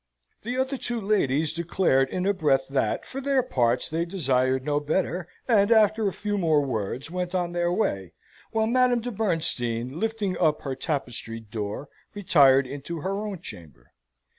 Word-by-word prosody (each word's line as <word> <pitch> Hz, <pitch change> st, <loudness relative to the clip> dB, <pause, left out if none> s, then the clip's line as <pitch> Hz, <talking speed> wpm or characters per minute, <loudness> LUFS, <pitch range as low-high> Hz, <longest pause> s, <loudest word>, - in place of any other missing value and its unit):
The 245 Hz, +3 st, -4 dB
other 265 Hz, +1 st, 0 dB
two 240 Hz, -1 st, -2 dB
ladies 160 Hz, -8 st, +1 dB
declared 165 Hz, -5 st, +1 dB
in 185 Hz, 0 st, -2 dB
a 200 Hz, -, +3 dB
breath 145 Hz, -7 st, +1 dB
that, 135 Hz, -6 st, -1 dB
for 270 Hz, -, -6 dB
their 275 Hz, -1 st, +2 dB
parts, 125 Hz, -, +1 dB
they 165 Hz, +2 st, -1 dB
desired 130 Hz, -7 st, 0 dB
no 145 Hz, -1 st, +1 dB
better, 170 Hz, +3 st, -1 dB, 0.2 s
and, 215 Hz, -3 st, +4 dB
after 215 Hz, -1 st, +4 dB
a -, -, 0 dB
few 205 Hz, +3 st, -3 dB
more 155 Hz, -5 st, +2 dB
words, 125 Hz, +4 st, -3 dB
went 180 Hz, 0 st, -3 dB
on 175 Hz, -1 st, 0 dB
their 175 Hz, 0 st, 0 dB
way, 100 Hz, -, -1 dB, 0.4 s
while 220 Hz, 0 st, +1 dB
Madame 245 Hz, +1 st, +3 dB
de 245 Hz, +2 st, -4 dB
Bernstein, 140 Hz, -, 0 dB
lifting 220 Hz, -4 st, -1 dB
up 155 Hz, -3 st, +2 dB
her 135 Hz, -, -3 dB
tapestried 120 Hz, -6 st, -4 dB
door, 105 Hz, +5 st, -4 dB, 0.3 s
retired 140 Hz, -9 st, +5 dB
into 145 Hz, +5 st, -6 dB
her 195 Hz, +4 st, -2 dB
own 195 Hz, -5 st, -6 dB
chamber. 75 Hz, -, -11 dB
170 Hz, 165 wpm, -26 LUFS, 135-205 Hz, 0.4 s, retired